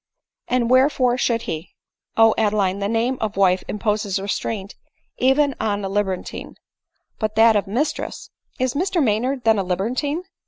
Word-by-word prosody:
" - - -69
And 245 -1 +1
wherefore 255 -1 +4
should 235 -1 +1
he 160 +2 -6
?" - - -68
" - - -45
O 225 -1 +6
Adeline, 205 -3 +1
the 200 - -1
name 235 +3 0
of 210 -3 -3
wife 185 -2 +3
imposes 210 -2 -1
restraint 200 0 -3 0.5
even 275 +2 +3
on 205 -2 -1
a - - -3
libertine; 195 -2 -3 0.6
but 215 -1 -2
that 225 0 +6
of 205 -1 +1
mistress 260 +10 -3
" - - -61
" - - -35
Is 255 -1 0
Mr 360 +4 0
Maynard 250 +3 0
then 220 -2 +3
a - - 0
libertine 250 - -2
220 Hz, 180 wpm, -21 LUFS, 200-255 Hz, 0.6 s, O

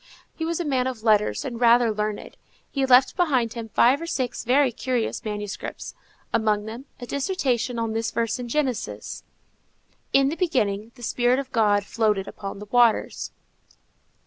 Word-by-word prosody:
He 320 - -4
was 335 +1 -2
a 345 - -2
man 260 -3 +1
of 245 -4 -5
letters 215 +5 +2
and 245 -3 -5
rather 235 -1 +5
learned. 210 0 -4 0.4
He 270 -2 0
left 255 0 +5
behind 260 -10 +1
him 230 -2 -6
five 255 +7 +4
or 335 - -5
six 255 -7 -2
very 260 +2 +3
curious 245 0 -2
manuscripts; 210 -2 -5 0.4
among 215 -1 +1
others, 235 +5 -7
a 245 - -6
dissertation 265 - -1
on 230 -1 -1
this 225 0 -1
verse 230 +2 -1
in 245 - -5
Genesis, 260 -2 -3 0.9
In 275 0 +4
the 310 - -3
beginning, 225 - 0
the 245 - -13
spirit 245 +2 +2
of 275 -1 -4
God 210 -4 +3
floated 210 -3 0
upon 200 -1 -7
the 205 - -8
waters. 240 -3 +2
240 Hz, 165 wpm, -24 LUFS, 220-265 Hz, 0.9 s, rather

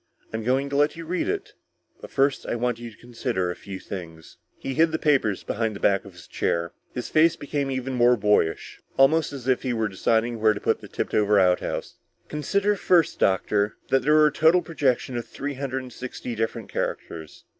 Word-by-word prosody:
I'm 110 0 -3
going 130 +4 +1
to - - -2
let 145 +1 +3
you 165 0 -8
read 180 - -1
it, 410 +1 -3 0.5
but - - -10
first 135 0 +1
I - - -1
want 120 0 -1
you 120 0 -7
to 110 - -17
consider 120 -6 -2
a - - -6
few 95 -1 -8
things." 80 -4 -9 0.2
He 135 - -4
hid 160 +3 +3
the 160 - 0
papers 135 - +1
behind 110 -1 -2
the - - -7
back 100 0 +2
of 100 - -12
his 85 -1 -14
chair; 85 0 -1 0.2
his 125 - -5
face 165 +1 +4
became 145 -2 -3
even 130 0 -3
more 120 0 +4
boyish, 105 -6 +1 0.2
almost 155 +4 +4
as 135 -3 -8
if 130 -1 +2
he 130 -2 -1
were 110 -2 0
deciding 115 +4 0
on - - -11
where 110 -1 +5
to - - -5
put - - 0
the - - -10
tipped - - -4
over 105 -1 +4
outhouse. 90 -1 0 0.3
"Consider 200 +8 0
first, 175 -4 +2
doctor, 100 +2 +1
that 135 - +3
there 150 +4 +3
was 155 0 +6
a - - -10
total 160 +4 +4
projection 135 -6 0
of 120 - -5
three 145 +1 -5
hundred 135 -1 -3
and 125 -2 -11
sixty 125 0 -6
different 115 -1 -3
characters. 80 -2 -5
125 Hz, 215 wpm, -25 LUFS, 105-145 Hz, 0.5 s, was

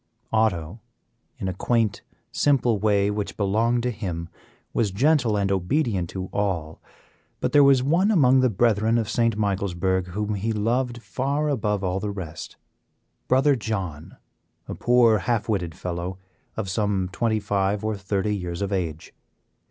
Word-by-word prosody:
Otto, 105 -3 0 0.6
in 95 - -4
a 95 - -2
quaint, 110 +2 0 0.3
simple 125 -7 +2
way 100 -1 +2
which 105 0 -4
belonged 115 +4 +1
to 125 - 0
him, 90 -6 -5 0.4
was 110 -3 +1
gentle 120 +1 +2
and 100 -1 0
obedient 95 - 0
to 95 -1 -5
all. 85 -6 -2 0.6
But - - -1
there 145 - +6
was 135 -2 +5
one 170 +9 +2
among 135 -10 +5
the 130 -1 +3
Brethren 110 +1 +2
of 115 -2 0
St. 115 -3 +1
Michaelsburg 95 -2 0
whom 105 +4 -3
he 105 +3 -2
loved 120 +3 -1
far 140 +3 -1
above 105 -7 -1
all 95 0 -1
the 105 - -3
rest 95 -6 -7 0.7
Brother 135 +3 +4
John, 95 - -5 0.5
a - - -4
poor 120 -3 +4
half 115 +2 -1
witted 90 -8 -2
fellow, 90 +1 -4 0.4
of 110 -3 -2
some 100 -1 0
twenty 110 +2 0
five 100 0 -1
or 110 -1 0
thirty 100 +1 -1
years 90 -1 -4
of 100 - -3
age. 80 -5 -3
105 Hz, 150 wpm, -24 LUFS, 95-120 Hz, 0.7 s, there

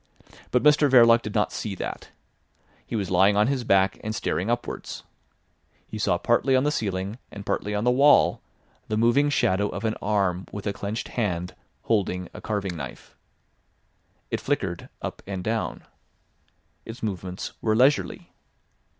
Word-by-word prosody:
But 125 - +1
Mr 150 -1 +5
Verloc 115 -2 +7
did 105 - -7
not 105 - +2
see 105 -3 -4
that. - - -6 0.8
He - - -4
was 100 -4 -2
lying 95 +3 +4
on 105 - +5
his 130 0 0
back 95 -3 +2
and 110 0 -3
staring 95 0 -1
upwards. 120 0 -4 0.8
He - - -7
saw - - +2
partly 135 - +2
on 130 - +3
the 150 - +2
ceiling 100 -3 -3
and 100 -1 -9
partly 105 +1 -2
on 105 - -1
the 125 - +4
wall 140 +4 +5 0.5
the 110 - -1
moving 120 +6 +3
shadow 100 -7 +1
of 100 +5 -5
an 110 - +1
arm 95 -3 0
with 100 -1 -7
a 100 - -1
clenched 105 +4 -4
hand 90 -6 -2 0.3
holding 90 -5 0
a - - -9
carving 100 -4 -2
knife. 75 - -9 1.2
It - - -1
flickered - - -2
up - - -5
and 95 -2 -4
down. 110 +2 -2 1.0
Its 115 +1 -9
movements 95 -3 -4
were 110 -1 +1
leisurely. 130 +5 +2
105 Hz, 160 wpm, -25 LUFS, 95-120 Hz, 1.2 s, Verloc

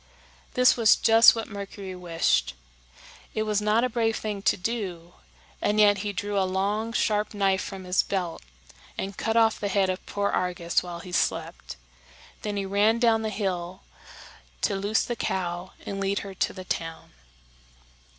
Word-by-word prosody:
This 250 0 +5
was 225 -3 +5
just 225 +1 +7
what 225 - -4
Mercury 200 -2 -7
wished. 165 - 0 0.8
It 215 - +1
was 210 -1 0
not 215 +3 +2
a - - +3
brave 225 -2 0
thing 210 -2 -4
to - - +2
do, 180 -5 -4 0.5
and 210 +1 +1
yet 205 -1 +5
he 205 +1 -2
drew 205 0 -2
a - - +3
long, 200 +4 -1
sharp 210 -2 0
knife 195 -2 +2
from 195 -2 -7
his 180 0 +2
belt 180 -4 -3 0.6
and 195 0 -4
cut 225 0 -1
off 225 -1 +4
the 205 - -2
head 195 -1 +2
of 185 - -6
poor 200 0 -1
Argus 175 -2 0
while 175 -1 -7
he 180 - -10
slept. - - -2 0.7
Then 205 -1 -3
he 200 - -2
ran 205 +3 +3
down 230 -2 +3
the 220 - -2
hill 185 -3 -3 0.8
to - - +1
loose 205 +3 +1
the 240 - -3
cow 180 -3 -3
and 195 - -4
lead 195 +1 0
her 195 - -7
to 185 - 0
the 185 -1 -9
town. 165 -2 -4
200 Hz, 170 wpm, -26 LUFS, 185-215 Hz, 0.8 s, just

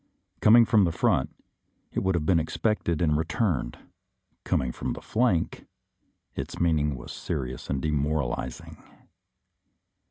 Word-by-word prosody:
Coming 115 +2 +7
from 110 -3 +4
the 85 - 0
front, - - +1 0.6
it - - -1
would 95 -1 +1
have 80 -3 -1
been 85 0 +4
expected 85 0 -1
and 75 -2 +2
re 80 - +1
turned; 85 - -1 0.7
coming 65 -1 0
from - - -4
the - - -7
flank, 110 -8 0 0.7
its - - -6
meaning 75 -4 +2
was 65 - -9
serious 65 0 -5
and 70 -2 -2
demoralizing. 70 -4 -2
80 Hz, 130 wpm, -27 LUFS, 70-95 Hz, 0.7 s, Coming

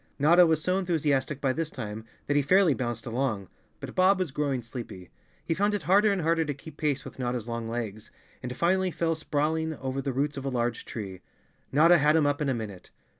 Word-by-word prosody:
Notta 170 +5 +6
was 160 -1 +1
so 185 +1 +1
enthusiastic 150 -6 0
by 135 -2 +1
this 165 +2 -2
time 110 -4 -6 0.2
that 145 - 0
he 145 - +4
fairly 180 +3 +4
bounced 120 -3 -4
along. 115 -5 -2 0.3
But - - -7
Bob 185 +1 +4
was 185 -6 -2
growing 135 -3 -1
sleepy. 115 -7 -8 0.3
He - - 0
found 205 +4 +1
it 205 - -4
harder 200 +6 +4
and 190 -4 -1
harder 165 +1 +2
to 145 -3 -3
keep 145 +2 -12
pace 150 -3 -1
with - - -10
Notta's 120 -2 -2
long 115 -1 -4
legs, 110 -2 -5 0.3
and 125 0 -6
finally 185 +2 +2
fell 165 -1 0
sprawling 160 +1 -1
over 135 0 -3
the 135 - -2
roots 140 +3 -1
of 135 - -5
a - - 0
large 120 -2 -2
tree. 95 -5 -7 0.5
Notta 165 +4 +6
had 150 +2 +4
him 160 -2 +4
up 145 +1 0
in 145 - +1
a 130 - +1
minute. 100 -6 -7
145 Hz, 220 wpm, -27 LUFS, 120-165 Hz, 0.5 s, Notta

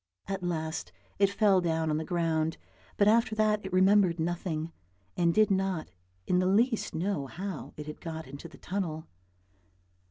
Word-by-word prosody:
At 195 -1 -3
last 160 -2 -3 0.3
it 200 -1 +5
fell 200 -2 +3
down 160 -2 0
on 150 - +1
the 160 - -2
ground, 160 -1 0 0.4
but 205 - +4
after 225 0 +4
that 215 -1 +2
it 190 - -6
remembered 185 -1 +4
nothing, 165 -1 -2 0.4
and 170 -1 +3
did 215 +3 +3
not 190 - 0 0.3
in 180 - +2
the 185 - +2
least 225 +4 +2
know 165 -5 -1
how 185 +4 -6
it 150 - -6
had 150 0 -8
got 160 -1 -5
into 140 +5 -9
the 165 - -15
tunnel. 170 -5 -3
175 Hz, 165 wpm, -29 LUFS, 160-200 Hz, 0.4 s, it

